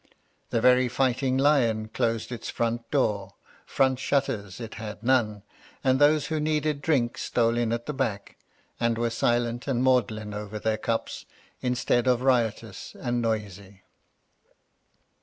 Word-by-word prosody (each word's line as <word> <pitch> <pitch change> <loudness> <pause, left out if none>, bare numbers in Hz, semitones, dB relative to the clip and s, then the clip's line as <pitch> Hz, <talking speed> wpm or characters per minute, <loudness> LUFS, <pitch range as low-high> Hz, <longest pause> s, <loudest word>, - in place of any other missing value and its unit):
The 115 - 0
very 125 +1 +5
Fighting 130 +1 +1
Lion 120 -6 +2
closed 115 0 -1
its 120 -2 -5
front 115 0 -2
door, 105 -8 0 0.3
front 130 -2 +2
shutters 115 -9 -1
it 115 -2 -7
had 105 -1 -7
none, 115 -5 +1 0.4
and 130 0 +3
those 145 0 +4
who 160 -3 -2
needed 150 -1 0
drink 135 -6 +1
stole 115 -1 +1
in 120 -1 0
at 120 0 -2
the 150 - -3
back, 115 -7 -3 0.4
and 115 -1 +1
were 115 0 0
silent 120 +1 0
and 130 -2 0
maudlin 110 -5 +1
over 105 0 -5
their 110 0 -1
cups, 115 +1 -3 0.3
instead 125 0 +1
of 125 0 +2
riotous 120 -5 0
and 120 0 -1
noisy. 100 -4 -4
120 Hz, 140 wpm, -26 LUFS, 110-130 Hz, 0.4 s, very